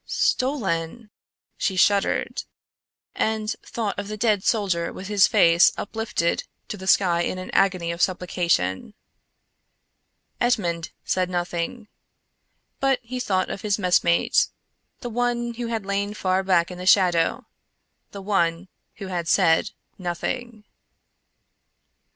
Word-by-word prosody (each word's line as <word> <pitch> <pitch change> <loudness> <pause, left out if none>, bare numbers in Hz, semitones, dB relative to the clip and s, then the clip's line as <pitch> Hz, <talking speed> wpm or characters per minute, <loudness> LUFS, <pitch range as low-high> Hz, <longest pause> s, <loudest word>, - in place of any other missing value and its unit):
"Stolen," 215 - -1 0.5
she 190 - 0
shuddered, 200 +2 +2 0.7
and 220 0 -1
thought 215 -4 -3
of 205 - -5
the 215 0 -5
dead 210 -3 +1
soldier 190 -7 0
with 190 +2 -8
his 205 -2 +5
face 170 +1 +5
uplifted 220 -6 -2 0.3
to - - -4
the 190 -1 -9
sky 175 -3 +3
in 185 - -2
an 185 - -7
agony 185 -3 +1
of 170 0 -5
supplication. 175 - 0 1.4
Edmond 175 -9 0 0.2
said 185 -1 0
nothing; 175 +5 -3 0.9
but 270 -1 +2
he 250 +2 -5
thought 190 -6 0
of 200 - -6
his 205 -2 0
messmate; 180 -3 +3 0.5
the 245 - -5
one 240 0 -1
who 235 0 -5
had 225 -3 -3
lain 200 +1 -2
far 185 -2 +1
back 180 -2 +2
in 180 - -8
the 180 - -5
shadow; 180 -4 +3 0.6
the 200 -1 -9
one 180 -2 0 0.3
who 200 - -8
had 175 -3 -3
said 165 -1 +3 0.3
nothing. 215 +6 -4
195 Hz, 125 wpm, -24 LUFS, 175-215 Hz, 1.4 s, his